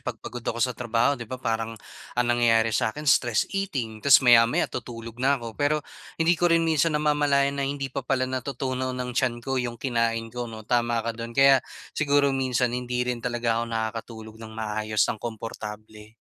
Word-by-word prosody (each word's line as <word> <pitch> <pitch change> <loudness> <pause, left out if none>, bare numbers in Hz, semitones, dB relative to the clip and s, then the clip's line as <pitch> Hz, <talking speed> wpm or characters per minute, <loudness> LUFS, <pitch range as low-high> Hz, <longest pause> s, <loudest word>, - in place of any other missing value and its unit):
'pag - - -5
pagod 120 - -8
ako 115 - -3
sa 125 +1 +1
trabaho 120 +4 +1
'di 120 -5 -6
ba 130 - -4
parang 115 -2 -2 0.4
ang 125 - +3
nangyayari 115 -2 +3
sa - - +2
akin 150 +7 -7
stress 120 -5 +3
eating, 130 - -3
tas 135 0 +6
maya-maya 115 -1 +6
tutulog 115 -1 -7
na 140 +2 +3
ako. 115 -2 -7
Pero, 145 +2 0 0.3
hindi 165 +1 +3
ko 175 0 +2
rin 165 0 +3
minsan 160 -1 +2
namamalayan 145 -2 +2
na 135 - 0
hindi 140 -2 -4
pa 140 - -2
pala 130 -1 0
natutunaw 130 0 -3
ng 125 0 -3
tiyan 120 0 +1
ko 135 -1 0
'yong 120 -1 -4
kinain 115 -2 -1
ko, 120 -1 -4
'no, 110 -1 -9
tama 120 -1 +1
ka 115 - -1
do'n 115 +1 -8
kaya 135 -1 +6 0.3
siguro 145 -2 +2
minsan 125 -2 0
hindi 125 0 -2
rin 125 -1 -2
talaga 120 -1 -1
ako - - -1
nakakatulog 110 0 -5
ng 110 0 -9
maayos, 110 0 0
ng 110 - -3
komportable. 110 -1 -8
120 Hz, 190 wpm, -25 LUFS, 115-135 Hz, 0.4 s, tas